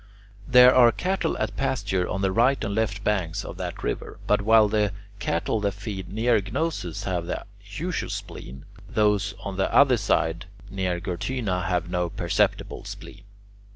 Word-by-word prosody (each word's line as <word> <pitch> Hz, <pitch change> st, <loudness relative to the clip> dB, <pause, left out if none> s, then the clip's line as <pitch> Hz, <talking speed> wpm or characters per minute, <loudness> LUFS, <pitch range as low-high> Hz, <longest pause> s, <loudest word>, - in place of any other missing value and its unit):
There 125 Hz, 0 st, +8 dB
are 120 Hz, -2 st, +7 dB
cattle 190 Hz, +7 st, -1 dB
at -, -, -2 dB
pasture 100 Hz, -9 st, -1 dB
on 95 Hz, +1 st, -2 dB
the 95 Hz, -, +2 dB
right 120 Hz, +6 st, +2 dB
and 100 Hz, -2 st, -2 dB
left 105 Hz, -2 st, -1 dB
banks 95 Hz, -7 st, -1 dB
of -, -, -8 dB
that -, -, -5 dB
river, -, -, -4 dB
but 105 Hz, -1 st, +2 dB
while 110 Hz, +1 st, +5 dB
the 105 Hz, -1 st, +1 dB, 0.3 s
cattle 85 Hz, +6 st, -1 dB
that 100 Hz, -1 st, -1 dB
feed 100 Hz, -2 st, -6 dB
near 115 Hz, +1 st, +2 dB
Gnosus 100 Hz, -, -3 dB
have 90 Hz, -3 st, -2 dB
the -, -, -4 dB, 0.2 s
usual 160 Hz, -, -4 dB
spleen, 65 Hz, +2 st, -7 dB, 0.2 s
those 105 Hz, -2 st, +1 dB
on 100 Hz, -1 st, -5 dB
the 95 Hz, -, 0 dB
other 135 Hz, -3 st, +5 dB
side 85 Hz, -4 st, 0 dB, 0.2 s
near 95 Hz, -3 st, -1 dB
Gortyna 90 Hz, 0 st, -2 dB
have 90 Hz, -1 st, 0 dB
no 90 Hz, -1 st, -1 dB
perceptible -, -, -1 dB
spleen. -, -, -10 dB
100 Hz, 160 wpm, -25 LUFS, 90-115 Hz, 0.3 s, There